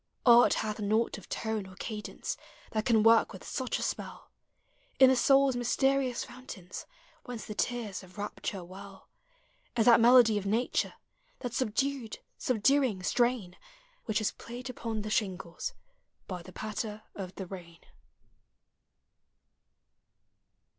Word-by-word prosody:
Art 240 Hz, -1 st, +7 dB
hath 215 Hz, 0 st, -2 dB
naught 215 Hz, +3 st, +1 dB
of -, -, -16 dB
tone 220 Hz, -3 st, -2 dB
or 185 Hz, -, -13 dB
cadence 210 Hz, +1 st, -5 dB, 0.4 s
That 215 Hz, -1 st, -1 dB
can 225 Hz, -3 st, +4 dB
work 225 Hz, 0 st, +6 dB
with 190 Hz, -, -10 dB
such 260 Hz, -2 st, -2 dB
a -, -, -3 dB
spell -, -, -5 dB, 0.7 s
In 265 Hz, -1 st, +8 dB
the -, -, +4 dB
soul's 270 Hz, +1 st, +4 dB
mysterious 260 Hz, +1 st, +1 dB
fountains. 190 Hz, -8 st, -9 dB, 0.4 s
Whence 245 Hz, -3 st, -6 dB
the 215 Hz, -, -6 dB
tears 225 Hz, -3 st, -2 dB
of 185 Hz, +1 st, -16 dB
rapture 205 Hz, -2 st, -4 dB
well, 190 Hz, +2 st, -12 dB, 0.7 s
As 225 Hz, -, +4 dB
that 235 Hz, -1 st, +8 dB
melody 230 Hz, -2 st, +7 dB
of 200 Hz, -, -8 dB
nature, 225 Hz, +5 st, 0 dB, 0.5 s
That 245 Hz, -3 st, -4 dB
subdued, 260 Hz, 0 st, -1 dB, 0.2 s
subduing 250 Hz, -3 st, +2 dB
strain 240 Hz, -5 st, +1 dB, 0.5 s
Which 215 Hz, -1 st, +1 dB
is 215 Hz, -1 st, 0 dB
played 250 Hz, +2 st, -8 dB
upon 225 Hz, -3 st, -4 dB
the 215 Hz, -, -4 dB
shingles 190 Hz, -, -2 dB, 0.5 s
By 180 Hz, -2 st, -5 dB
the 185 Hz, -, -12 dB
patter 215 Hz, +2 st, -5 dB
of 190 Hz, -2 st, -7 dB
the 190 Hz, -, -5 dB
rain. 175 Hz, -3 st, -10 dB
220 Hz, 135 wpm, -30 LUFS, 200-245 Hz, 0.7 s, In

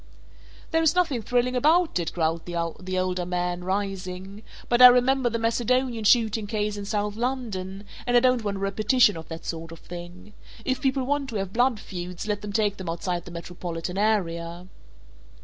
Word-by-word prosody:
"There 325 Hz, -1 st, +3 dB
is 320 Hz, +1 st, +3 dB
nothing 320 Hz, -10 st, +1 dB
thrilling 245 Hz, +2 st, +1 dB
about 315 Hz, -, +3 dB
it," 165 Hz, -2 st, -2 dB
growled 165 Hz, -1 st, -1 dB
the 175 Hz, +2 st, -3 dB
older 185 Hz, -1 st, -1 dB
man, 180 Hz, 0 st, -2 dB
rising, 195 Hz, 0 st, -4 dB, 0.3 s
"but 240 Hz, +1 st, +2 dB
I 250 Hz, -, +13 dB
remember 250 Hz, +1 st, +4 dB
the 230 Hz, -, -1 dB
Macedonian 235 Hz, +1 st, 0 dB
shooting 220 Hz, -2 st, +3 dB
case 210 Hz, -1 st, -1 dB
in 205 Hz, -1 st, -6 dB
South 205 Hz, 0 st, -1 dB
London 215 Hz, -6 st, -3 dB, 0.2 s
and 245 Hz, 0 st, +4 dB
I -, -, +8 dB
don't 255 Hz, -1 st, +2 dB
want 200 Hz, -1 st, -2 dB
a -, -, -7 dB
repetition 210 Hz, +3 st, +3 dB
of 160 Hz, -1 st, -8 dB
that 165 Hz, 0 st, -8 dB
sort 165 Hz, 0 st, -5 dB
of 165 Hz, -, -9 dB
thing. 175 Hz, +4 st, -10 dB, 0.3 s
If 260 Hz, -1 st, -1 dB
people 265 Hz, -1 st, +1 dB
want 280 Hz, +1 st, -1 dB
to 230 Hz, -, -6 dB
have 195 Hz, -2 st, -3 dB
blood 245 Hz, -1 st, +2 dB
feuds, 180 Hz, -3 st, -6 dB
let 205 Hz, -1 st, -2 dB
them 210 Hz, 0 st, -5 dB
take 205 Hz, -1 st, +1 dB
them 185 Hz, -3 st, -5 dB
outside 175 Hz, +1 st, -3 dB
the -, -, -9 dB
metropolitan 170 Hz, +1 st, -5 dB
area." 175 Hz, -5 st, 0 dB
205 Hz, 185 wpm, -25 LUFS, 180-245 Hz, 0.3 s, I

